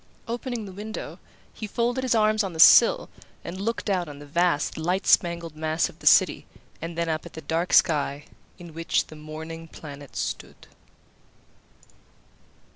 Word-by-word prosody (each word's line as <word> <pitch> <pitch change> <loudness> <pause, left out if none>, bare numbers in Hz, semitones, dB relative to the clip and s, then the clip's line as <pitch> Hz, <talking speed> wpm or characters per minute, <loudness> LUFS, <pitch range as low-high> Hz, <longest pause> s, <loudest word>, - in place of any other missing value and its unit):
Opening 240 -1 -4
the 195 - -9
window, 210 +3 -7 0.3
he 215 - -6
folded 240 +4 -1
his 255 -2 +1
arms 215 0 +3
on 190 -3 -4
the 160 - -8
sill - - +7 0.4
and 185 +3 -6
looked 230 +2 -3
out 180 -5 0
on 145 - -9
the 145 - -11
vast 170 0 0
light 180 +5 -1
spangled 170 -2 +2
mass 155 +1 0
of - - -17
the - - -4
city, - - +5 0.3
and 165 +1 -6
then 170 0 0
up 155 -1 -2
at - - -15
the 160 - -8
dark 165 +3 -2
sky, 145 -2 +2 0.3
in 175 -3 -12
which 165 +1 0
the 155 - -13
morning 160 +2 -8
planet 145 -3 -11
stood. - - -5
170 Hz, 165 wpm, -25 LUFS, 155-210 Hz, 0.4 s, sill